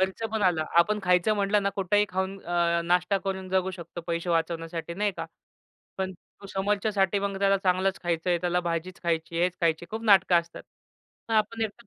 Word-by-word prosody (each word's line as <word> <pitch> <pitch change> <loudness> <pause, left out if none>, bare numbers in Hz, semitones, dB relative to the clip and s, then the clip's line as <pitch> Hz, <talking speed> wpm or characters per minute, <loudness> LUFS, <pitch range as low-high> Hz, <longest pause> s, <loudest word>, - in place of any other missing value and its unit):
खर्च 190 +4 -1
पण 220 -2 -1
आला. 170 -4 +2
आपण 210 +5 +4
खायचं 180 +3 +3
म्हटलं 205 0 +1
ना, 200 - +1
कुठेही 200 +2 +2
खाऊन 190 +1 -2
अ, 170 -1 +1
नाश्ता 180 +3 +2
करून 190 -1 -3
जगू 190 0 +1
शकतो, 170 -1 -8
पैसे 170 +1 -2
वाचवण्यासाठी, 165 0 -2
नाही 205 +2 0
का? 165 - -4 0.7
पण 190 0 -2 0.4
समोरच्यासाठी 200 0 +1
मग 200 -1 -2
त्याला 195 0 +3
चांगलंच 190 0 0
खायचंय, 175 0 0
त्याला 180 +1 0
भाजीच 170 +2 -4
खायची, 165 0 -1
हेच 180 0 0
खायची, 165 0 +1
खूप 220 +1 -4
नाटकं 190 -4 +5
असतात. 170 0 -12 0.8
आपण 225 +2 -2
एकटं 220 +2 -8
185 Hz, 170 wpm, -27 LUFS, 170-195 Hz, 0.8 s, नाटकं